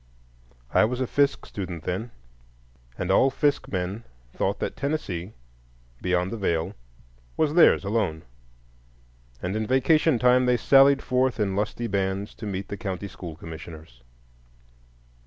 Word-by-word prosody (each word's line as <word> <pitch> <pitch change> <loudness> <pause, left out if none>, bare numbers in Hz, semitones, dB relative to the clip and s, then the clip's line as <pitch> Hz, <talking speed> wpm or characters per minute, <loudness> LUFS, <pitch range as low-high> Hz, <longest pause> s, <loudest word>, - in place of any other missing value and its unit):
I - - +5
was 120 +3 0
a 130 - +1
Fisk 140 +3 +1
student 90 -5 -6
then, 95 +7 -3 0.9
and 90 - -1
all 130 +7 +5
Fisk 145 +2 0
men 95 +4 -3 0.3
thought - - -1
that - - -3
Tennessee—beyond 85 - -4
the 115 - -4
Veil—was - - -3
theirs 170 -8 +6
alone, 100 -7 -1 1.2
and 90 +3 -2
in 110 0 -2
vacation 145 +3 +3
time 125 +1 +4
they 125 0 +3
sallied 135 +3 +5
forth 130 -1 +1
in 100 -2 0
lusty 105 +3 -2
bands 100 -1 -2
to 110 - -4
meet 95 -1 -4
the 100 - -5
county 95 0 -4
school 85 -3 -9
commissioners. 80 -5 -10
100 Hz, 130 wpm, -25 LUFS, 85-125 Hz, 1.2 s, theirs